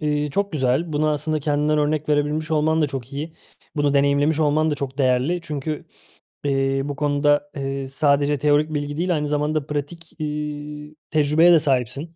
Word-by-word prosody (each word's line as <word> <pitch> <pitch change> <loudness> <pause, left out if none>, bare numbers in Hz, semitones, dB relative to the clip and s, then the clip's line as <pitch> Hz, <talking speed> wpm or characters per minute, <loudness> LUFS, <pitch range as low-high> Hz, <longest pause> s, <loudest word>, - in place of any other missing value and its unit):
eee, 150 -1 0
çok 200 +6 -1
güzel. 145 +3 0
Bunu 150 +1 +1
aslında 155 +1 -1
kendinden 150 +1 +1
örnek 150 0 0
verebilmiş 150 +2 0
olman 160 +1 +2
da - - +3
çok 135 -2 -6
iyi. 155 +3 -5 0.4
Bunu 145 -1 +1
deneyimlemiş 140 +2 +2
olman 155 +1 +2
da - - 0
çok 140 -1 -6
değerli. 130 +6 +2
Çünkü, 150 -1 -4 0.6
eee, 135 -1 +1
bu 145 -1 -4
konuda, 145 0 +1
eee, 135 -1 -3
sadece 145 +1 +2
teorik 150 +2 +2
bilgi 145 0 -3
değil, 175 +1 +1
aynı 150 -1 -1
zamanda 150 0 0
pratik, 155 +3 -5
eee, 150 0 -5 0.2
tecrübeye 155 +2 +4
de 170 - +7
sahipsin. 140 +3 -1
150 Hz, 170 wpm, -22 LUFS, 140-155 Hz, 0.6 s, de